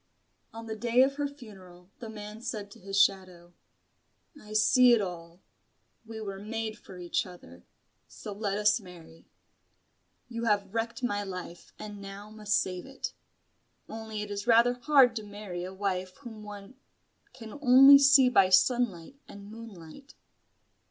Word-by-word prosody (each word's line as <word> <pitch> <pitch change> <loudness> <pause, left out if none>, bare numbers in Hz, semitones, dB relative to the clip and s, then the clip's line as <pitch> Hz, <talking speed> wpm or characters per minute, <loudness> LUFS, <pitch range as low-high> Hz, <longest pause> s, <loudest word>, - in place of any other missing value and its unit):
On 225 0 -9
the 220 -1 -5
day 240 +3 +3
of 275 +1 -1
her 290 -1 -1
funeral, 190 -9 -15
the 230 - -8
man 210 0 -9
said 215 -4 -6
to - - -14
his 195 +1 -2
shadow 185 -3 0 0.8
"I 215 -7 -12
see 245 +3 +5
it 235 - +4
all. 175 -2 -7 0.7
We 225 -1 -8
were 195 -3 -6
made 220 +1 -5
for 185 - -13
each 175 -1 -1
other, 85 - -14 0.4
so 210 - -9
let 200 -1 -3
us 210 +2 +3
marry. 170 -4 -15 1.0
You 235 -1 -5
have 205 -2 0
wrecked 230 +3 -3
my 205 -4 -1
life 180 -3 -9
and 205 -1 -9
now 200 +2 -10
must 210 -1 -2
save 185 +4 -5
it. 270 - -6 0.7
Only 220 -1 -6
it 205 - -8
is 205 +1 -5
rather 235 +1 +5
hard 250 -1 +4
to 220 - -5
marry 205 -4 -7
a 185 - -6
wife 185 -1 -4
whom 225 -5 -10
one 210 +3 -11 0.5
can 240 +1 -11
only 270 +1 +8
see 275 -2 +6
by 195 -7 +4
sunlight 200 +2 +1
and 200 +1 -12
moonlight." 225 - -12
210 Hz, 155 wpm, -28 LUFS, 190-235 Hz, 1.0 s, only